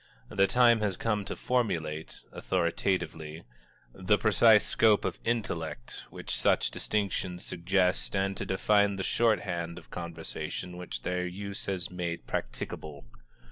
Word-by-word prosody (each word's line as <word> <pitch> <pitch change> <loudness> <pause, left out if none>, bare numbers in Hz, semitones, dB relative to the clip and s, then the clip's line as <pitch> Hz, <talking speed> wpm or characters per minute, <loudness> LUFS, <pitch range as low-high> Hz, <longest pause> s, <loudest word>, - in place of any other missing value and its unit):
The 100 -1 +3
time 120 -1 +5
has 100 -4 -1
come 105 -3 0
to - - -4
formulate, 80 -11 -1
authoritatively, 85 -3 -1 0.5
the 95 +2 +2
precise 110 +1 +5
scope 110 -2 +4
of - - -2
intellect 85 - -3
which - - -5
such - - +2
distinctions 95 -3 -2
suggest 90 -8 +1
and 95 0 0
to - - -3
define 100 +1 +3
the 95 - -3
shorthand 90 -8 0
of 85 - -13
conversation 85 +1 -5
which 90 0 -6
their 90 0 -1
use 100 +2 -6
has 95 -2 -2
made 85 -2 -4
practicable. 70 +3 -5
95 Hz, 130 wpm, -29 LUFS, 85-105 Hz, 0.5 s, time